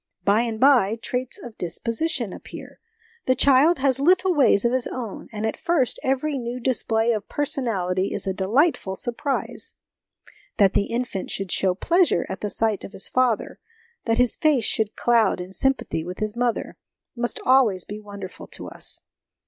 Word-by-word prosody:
By 205 Hz, +3 st, +3 dB
and 230 Hz, -2 st, -3 dB
by, 245 Hz, -6 st, +5 dB
traits 250 Hz, +2 st, -3 dB
of 235 Hz, -3 st, -11 dB
disposition 230 Hz, -, -2 dB
appear, -, -, -11 dB, 0.5 s
the 255 Hz, -, +4 dB
child 280 Hz, +6 st, +5 dB
has 265 Hz, -1 st, +2 dB
little 365 Hz, +5 st, +3 dB
ways 260 Hz, -8 st, +4 dB
of 235 Hz, -, +3 dB
his 255 Hz, -1 st, 0 dB
own; 235 Hz, -6 st, -6 dB
and, 215 Hz, 0 st, -3 dB
at 220 Hz, -, -1 dB
first, 300 Hz, -8 st, 0 dB
every 270 Hz, +2 st, 0 dB
new 240 Hz, +1 st, -4 dB
display 230 Hz, -2 st, +1 dB
of 215 Hz, -3 st, -3 dB
person 285 Hz, -2 st, -2 dB
ality 185 Hz, -3 st, -1 dB
is 205 Hz, -, -3 dB
a 190 Hz, -, -1 dB
delightful 205 Hz, -, +1 dB
surprise. 245 Hz, +6 st, -3 dB, 0.8 s
That 195 Hz, -3 st, +4 dB
the 200 Hz, -, +2 dB
infant 235 Hz, -5 st, -3 dB
should 195 Hz, -2 st, -3 dB
show 185 Hz, -2 st, +1 dB
pleasure 345 Hz, -, +2 dB
at 190 Hz, -, -5 dB
the 210 Hz, -, -2 dB
sight 220 Hz, -1 st, 0 dB
of -, -, -9 dB
his -, -, -4 dB
father, 255 Hz, -4 st, 0 dB, 0.5 s
that 225 Hz, -1 st, +1 dB
his 250 Hz, -1 st, +3 dB
face 290 Hz, -8 st, +2 dB
should 215 Hz, -1 st, 0 dB
cloud 235 Hz, -5 st, +2 dB
in 180 Hz, +1 st, -7 dB
sympathy 265 Hz, -7 st, 0 dB
with 180 Hz, +2 st, -7 dB
his 215 Hz, 0 st, -3 dB
mother, 240 Hz, -1 st, -1 dB, 0.4 s
must 240 Hz, 0 st, -1 dB
always 240 Hz, -9 st, +4 dB
be 210 Hz, +1 st, -7 dB
wonderful 200 Hz, -3 st, -9 dB
to -, -, -8 dB
us. -, -, -7 dB
235 Hz, 175 wpm, -23 LUFS, 200-260 Hz, 0.8 s, by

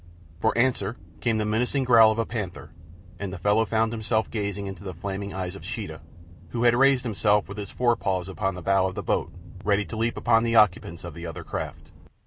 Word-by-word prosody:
For 110 Hz, -, +1 dB
answer 115 Hz, -3 st, +1 dB, 0.2 s
came 115 Hz, -2 st, +1 dB
the 110 Hz, -, 0 dB
menacing 125 Hz, +6 st, +1 dB
growl 115 Hz, -3 st, +7 dB
of 110 Hz, -, -2 dB
a 115 Hz, -, +1 dB
panther, 105 Hz, -7 st, -5 dB, 0.5 s
and 100 Hz, -2 st, -4 dB
the 95 Hz, -, -5 dB
fellow 105 Hz, +5 st, +2 dB
found 110 Hz, 0 st, +1 dB
himself 110 Hz, -1 st, -1 dB
gazing 100 Hz, -2 st, -3 dB
into 95 Hz, +1 st, -7 dB
the 95 Hz, -3 st, -6 dB
flaming 100 Hz, +3 st, -4 dB
eyes 90 Hz, -1 st, -4 dB
of -, -, -10 dB
Sheeta, 80 Hz, 0 st, -5 dB, 0.5 s
who 120 Hz, 0 st, -2 dB
had 120 Hz, -1 st, +6 dB
raised 135 Hz, 0 st, +4 dB
himself 105 Hz, -3 st, +2 dB
with 100 Hz, +2 st, -7 dB
his 100 Hz, -, -5 dB
forepaws 110 Hz, -7 st, 0 dB
upon 95 Hz, 0 st, -2 dB
the 90 Hz, -, -8 dB
bow 95 Hz, +1 st, +3 dB
of 95 Hz, -, -6 dB
the -, -, -4 dB
boat, -, -, 0 dB, 0.3 s
ready 105 Hz, 0 st, +2 dB
to 115 Hz, -, -7 dB
leap 115 Hz, +1 st, -1 dB
in -, -, -2 dB
upon 115 Hz, -, +5 dB
the 115 Hz, 0 st, 0 dB
occupants 90 Hz, -5 st, +3 dB
of 85 Hz, -2 st, -7 dB
the 85 Hz, +2 st, -7 dB
other 80 Hz, -, -7 dB
craft. -, -, -6 dB
105 Hz, 220 wpm, -26 LUFS, 95-115 Hz, 0.5 s, growl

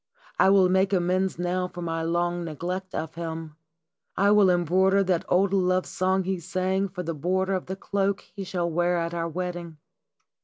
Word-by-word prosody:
I -, -, +6 dB
will 195 Hz, -1 st, +5 dB
make 190 Hz, +2 st, +2 dB
amends 185 Hz, 0 st, +1 dB
now 180 Hz, +1 st, -1 dB
for 175 Hz, -1 st, -8 dB
my 165 Hz, -1 st, -2 dB
long 175 Hz, +1 st, -1 dB
neglect 180 Hz, +4 st, -5 dB
of 160 Hz, 0 st, -4 dB
him. 160 Hz, -2 st, -6 dB, 0.6 s
I 200 Hz, +1 st, +4 dB
will 205 Hz, -2 st, +6 dB
embroider 185 Hz, +3 st, +3 dB
that 180 Hz, -3 st, 0 dB
old 190 Hz, +2 st, +3 dB
love 185 Hz, -1 st, +2 dB
song 190 Hz, +1 st, 0 dB
he 190 Hz, 0 st, -2 dB
sang 190 Hz, +2 st, -1 dB
for 180 Hz, 0 st, -6 dB
the 165 Hz, 0 st, -3 dB
border 185 Hz, +5 st, 0 dB
of 185 Hz, -, -2 dB
the 190 Hz, -, -3 dB
cloak 195 Hz, 0 st, -1 dB
he 200 Hz, -, -9 dB
shall 175 Hz, -2 st, -2 dB
wear 175 Hz, +1 st, +1 dB
at 170 Hz, 0 st, -2 dB
our 170 Hz, -1 st, -2 dB
wedding. 175 Hz, -2 st, -5 dB
180 Hz, 185 wpm, -26 LUFS, 170-190 Hz, 0.6 s, I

